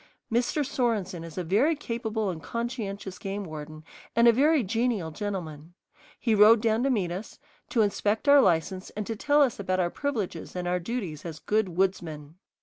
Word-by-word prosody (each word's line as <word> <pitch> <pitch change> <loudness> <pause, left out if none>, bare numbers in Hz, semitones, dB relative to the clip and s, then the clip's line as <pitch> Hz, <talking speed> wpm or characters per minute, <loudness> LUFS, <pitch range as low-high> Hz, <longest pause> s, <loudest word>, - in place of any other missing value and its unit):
Mr. 245 +5 +1
Sorenson 215 -10 -1
is 165 0 -10
a 180 - -1
very 225 - +2
capable 220 -6 -2
and 160 -3 -7
conscientious 210 -6 -4
game 200 +1 -4
warden 155 -1 -8 0.3
and 235 0 +5
a 235 - +8
very 290 +3 +3
genial 225 -5 -1
gentleman. 170 -4 -5 0.4
He 230 - +1
rode 215 +2 +7
down 220 0 +1
to - - +2
meet 200 -9 0
us, 190 +5 -6 0.3
to 230 - +3
inspect 210 +4 0
our 285 0 +8
license 185 0 +1
and 210 - -2
to 225 - -3
tell 290 +6 +4
us 250 -7 -1
about 185 -1 -1
our 175 -1 +1
privileges 220 - -3
and 180 -1 -3
our 180 0 +1
duties 180 -6 -4
as 165 -3 -6
good 200 -1 -1
woodsmen. 160 -6 -1
205 Hz, 180 wpm, -27 LUFS, 175-235 Hz, 0.4 s, a